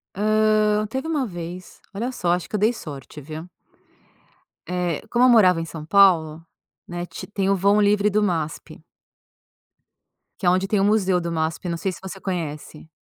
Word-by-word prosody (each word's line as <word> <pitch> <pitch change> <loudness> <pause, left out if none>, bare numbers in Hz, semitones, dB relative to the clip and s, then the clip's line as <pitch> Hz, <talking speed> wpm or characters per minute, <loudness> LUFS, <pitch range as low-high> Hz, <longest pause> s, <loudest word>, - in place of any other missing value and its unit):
Hã, 215 0 +2
teve 265 +6 -4
uma 310 -4 0
vez, 175 -3 -8
olha 230 +6 -2
só, 180 -9 -1
acho 180 0 -1
que - - -2
eu - - -2
dei 215 +3 +3
sorte, 150 - -9
viu. 155 +4 -8 1.2
Eh, 180 -3 -2
como 240 +3 +3
eu - - +7
morava 185 -8 +5
em - - -3
São 160 -2 -8
Paulo, 165 -3 +4 0.4
né, 175 0 -5
ti - - -9
tem 200 -2 -2
o 195 - +3
vão 200 +3 +3
livre 205 0 +3
do 210 +1 +1
MASP 165 -6 -3 1.6
que 190 - -2
é - - +6
onde 185 +2 +1
tem 200 0 +1
o - - +3
museu 195 -3 +2
do 170 0 -4
MASP, 160 +2 -2
não 170 - -2
sei 190 +3 -2
se - - -10
você 190 0 -7
conhece? 160 -5 -5
185 Hz, 185 wpm, -23 LUFS, 170-210 Hz, 1.6 s, eu